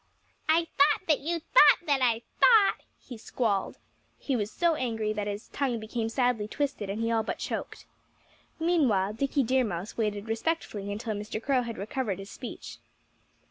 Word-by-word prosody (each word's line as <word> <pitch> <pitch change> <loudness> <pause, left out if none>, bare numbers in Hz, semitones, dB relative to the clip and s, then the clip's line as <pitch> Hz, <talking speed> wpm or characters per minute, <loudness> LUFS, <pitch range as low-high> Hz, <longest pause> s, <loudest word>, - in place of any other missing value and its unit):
"I 330 +1 +4
thought 290 +5 +4
that 305 -3 +3
you 335 +4 -2
thought 300 0 +6
that 285 -4 +1
I 235 -2 +2 0.2
thought 445 -5 +6 0.2
" - - -42
he 240 -3 -8
squalled. 215 -4 -1 0.4
He 275 - -2
was 210 -3 -1
so 340 -1 +2
angry 225 -7 -2
that 210 -1 -3
his 205 +2 -5
tongue 260 -5 -1
became 225 +1 -3
sadly 245 -3 0
twisted; 270 -5 -3
and 205 +3 -3
he 230 - 0
all 225 -1 +2
but 220 - -4
choked. - - -5 0.7
Meanwhile 260 - +2
Dickie 275 +4 0
Deer 255 +2 +2
Mouse 200 -2 -5
waited 210 -1 -2
respectfully 225 -4 -2
until 215 +2 -3
Mr. 210 +1 -5
Crow 260 +2 +1
had 235 -2 -6
recovered 210 -1 -3
his 195 +1 -9
speech. 250 - -8
230 Hz, 175 wpm, -28 LUFS, 210-280 Hz, 0.7 s, thought